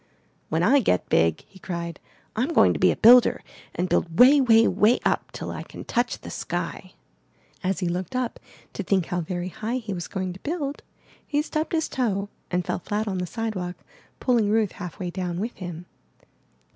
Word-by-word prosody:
*'When 160 +2 +1
I 270 +9 +5
get 90 - +1
big," 80 -1 +3
he 190 - -17
cried, 170 -3 -5 0.4
''I'm 260 +9 -1
going - - +6
to - - -4
be - - +5
a - - +2
builder, 245 +2 +6 0.3
and 180 +2 0
build 165 -2 0
way, 275 +3 +8
way, 225 -3 +5
way 220 +4 +4
up - - 0
till - - -6
I - - -5
can - - -10
touch 240 +1 -1
the - - -8
sky!*' - - -4 0.7
As 190 +1 -1
he 180 - 0
looked 180 +4 -3
up 255 -2 -2 0.3
to - - -4
think 190 -2 +1
how 175 +1 -2
very 175 +2 -4
high 225 +6 -3
he 220 -5 -5
was 175 -3 -5
going 185 -2 -3
to 185 - -12
build, 290 - -3 0.5
he 295 0 +1
stubbed 310 +1 -3
his 320 -1 +1
toe 205 -6 -1 0.2
and 180 -1 -1
fell - - -2
flat 210 +4 -2
on 190 -2 -2
the 180 - -2
sidewalk, 190 -5 -3 0.4
pulling 235 -5 +2
Ruth 215 -2 +2
half 180 -4 -8
way 180 -3 -4
down 180 -1 -3
with 225 +5 -4
him. 175 -2 -7
200 Hz, 195 wpm, -25 LUFS, 180-240 Hz, 0.7 s, way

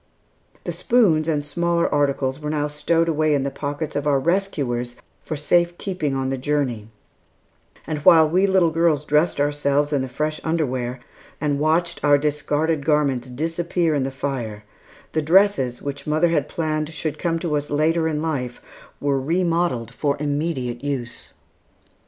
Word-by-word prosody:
The - - -3
spoons 175 -11 +2
and 150 -3 0
smaller 170 +3 0
articles 140 -2 0
were 150 -1 -4
now 150 -1 0
stowed 165 +3 0
away 155 -2 +2
in 140 - 0
the 140 - -2
pockets 145 +2 -4
of 145 +1 -1
our 140 -2 +3
rescuers 135 -8 -1 0.3
for 155 - -5
safekeeping 175 0 0
on 135 0 -1
the 135 - -2
journey; 130 -6 -1 1.0
and 155 - -3
while 160 +2 +7
we 185 +5 +2
little 185 -4 +3
girls 160 -3 +2
dressed 150 +1 +2
ourselves 145 0 +1
in 140 - +2
the 130 - -4
fresh 155 +4 -2
underwear, 130 -6 -1 0.4
and 145 -2 0
watched 165 +3 0
our 145 -1 +5
discarded 150 +1 0
garments 140 -5 +1
disappear 165 +4 -1
in 145 - +1
the 135 - -1
fire, 130 -6 -4 0.5
the 155 - 0
dresses, 155 -7 +3
which 140 0 -5
mother 155 +3 +2
had 150 -3 0
planned 155 -2 -2
should 155 -1 -4
come 165 -1 0
to 165 -2 -2
us 145 0 -2
later 160 +3 +1
in 155 -1 -2
life, 130 -7 -3 0.4
were 140 -2 0
remodelled 165 -6 0
for 145 -2 -1
immediate 145 -5 -2
use. 130 -5 -5
150 Hz, 160 wpm, -22 LUFS, 140-165 Hz, 1.0 s, while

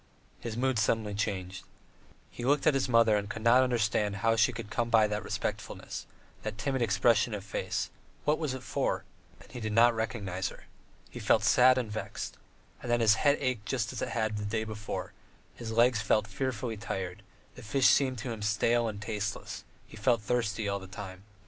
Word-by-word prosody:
His 115 -1 -5
mood 130 -1 +1
suddenly 110 -1 +1
changed. 95 -3 -3 0.7
He 120 - -7
looked 145 +3 +2
at 155 - +5
his 135 -1 0
mother 115 -2 +5
and 100 0 -3
could 110 +1 -6
not 120 +2 +6
understand 105 -5 +1
how 115 +3 +2
she 115 +2 +4
had 110 -2 -7
come 120 +1 0
by 110 -2 +5
that 105 -1 -2
respectfulness, - - -4 0.3
that 110 -1 -5
timid 130 +3 -1
expression 115 0 +3
of 100 - -6
face: 100 - -3 0.3
what 150 +1 +2
was 150 -5 -2
it 130 - -8
for? - - -1 0.4
And - - -17
he 125 - -6
did 110 -2 -3
not 120 +2 +6
recognize 100 -5 -2
her. - - -13 0.5
He - - -7
felt - - +3
sad 130 +1 +6
and 120 -4 -2
vexed. 110 - -5 0.5
And 120 - -3
then 120 - +3
his 110 -2 +6
head 145 +5 +3
ached 125 -6 -2
just 115 -4 -1
as - - -5
it - - -2
had 110 -2 -1
the 105 - -3
day 110 +2 -1
before; 110 -1 -5 0.4
his 115 -2 -7
legs 115 0 +4
felt 110 0 +2
fearfully 115 0 -3
tired, 95 -4 -4 0.3
and - - -26
the - - -9
fish 135 +4 0
seemed 130 -2 +4
to 125 - -2
him 110 -2 -6
stale 115 +3 +2
and 105 -2 -4
tasteless; 110 0 -4 0.2
he - - -14
felt 115 0 +2
thirsty 110 -3 0
all 100 0 -1
the 95 - -10
time. 95 0 -9
110 Hz, 200 wpm, -30 LUFS, 105-120 Hz, 0.7 s, not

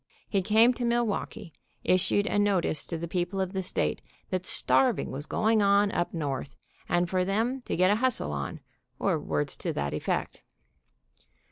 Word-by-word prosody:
He 195 - +1
came 220 +6 +5
to 245 - -5
Milwaukee, 225 -5 -1 0.3
issued 185 +2 +2
a 205 - 0
notice 195 -7 +1
to 165 - -3
the 170 +1 -4
people 175 +2 -2
of 190 0 -1
the 190 - -1
state 185 - -1 0.3
that 185 -1 -2
starving 130 +1 +2
was 145 +3 -5
going 220 0 +2
on 200 0 +4
up 175 - -1
North, 145 -4 -4 0.3
and 175 0 +2
for 185 +1 +1
them 225 +8 0
to - - -1
get 185 +2 +4
a 210 - +3
hustle 250 - +1
on, 70 -1 -4 0.4
or - - +1
words 75 -2 -2
to - - -3
that 70 0 -2
effect. - - -2
185 Hz, 170 wpm, -28 LUFS, 165-210 Hz, 0.4 s, came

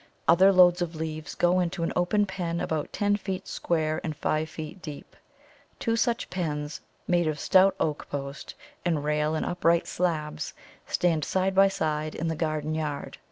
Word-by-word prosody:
Other 185 +4 +7
loads 180 -1 +6
of 170 -1 -2
leaves 155 -1 -5
go 175 +1 +3
into 175 -1 -1
an 165 - -1
open 205 +4 +2
pen 175 -3 -3
about 155 -3 -2
ten 205 0 +1
feet 190 -2 -5
square 155 -2 -1
and 155 -2 -3
five 155 +2 -1
feet 155 +4 -8
deep. 150 -4 -9 0.6
Two 230 -1 0
such 235 0 0
pens, 150 -3 -3 0.3
made 175 -2 +2
of 155 -1 -1
stout 190 +4 +5
oak 150 -2 -2
post 140 0 -6 0.3
and 165 -5 0
rail 150 +1 +1
and 155 - -1
upright 170 -1 +2
slabs, 155 -4 -2 0.3
stand 165 -4 +1
side 190 0 0
by 195 +1 +6
side 155 -5 -2
in 165 +1 -2
the 160 - -1
garden 155 -1 -1
yard. 150 -2 -4
165 Hz, 170 wpm, -27 LUFS, 155-185 Hz, 0.6 s, Other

